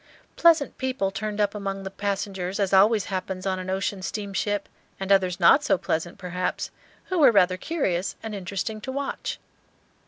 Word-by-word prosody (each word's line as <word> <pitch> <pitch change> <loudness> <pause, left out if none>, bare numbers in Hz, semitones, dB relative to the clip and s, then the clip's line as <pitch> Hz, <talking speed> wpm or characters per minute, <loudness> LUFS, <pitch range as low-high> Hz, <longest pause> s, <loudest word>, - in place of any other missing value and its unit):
Pleasant 330 -4 +4
people 255 -7 -1
turned 215 +1 -4
up 205 -1 +2
among 195 -1 -4
the 190 - -5
passengers, 195 -2 -3
as 195 -1 0
always 205 +1 +5
happens 185 0 -3
on 190 -1 0
an 185 0 -5
ocean 190 +1 -1
steamship, 205 0 -2 0.3
and 195 0 -2
others 185 -2 +3
not 230 - +6
so 300 - +3
pleasant, 170 +1 -2
perhaps, 180 -1 -3 0.4
who 370 -2 0
were 275 -5 +7
rather 185 -4 +4
curious 190 - -1
and 220 -1 -5
interesting 200 +3 -4
to 260 - -5
watch. 280 +1 -3
195 Hz, 165 wpm, -25 LUFS, 185-215 Hz, 0.4 s, were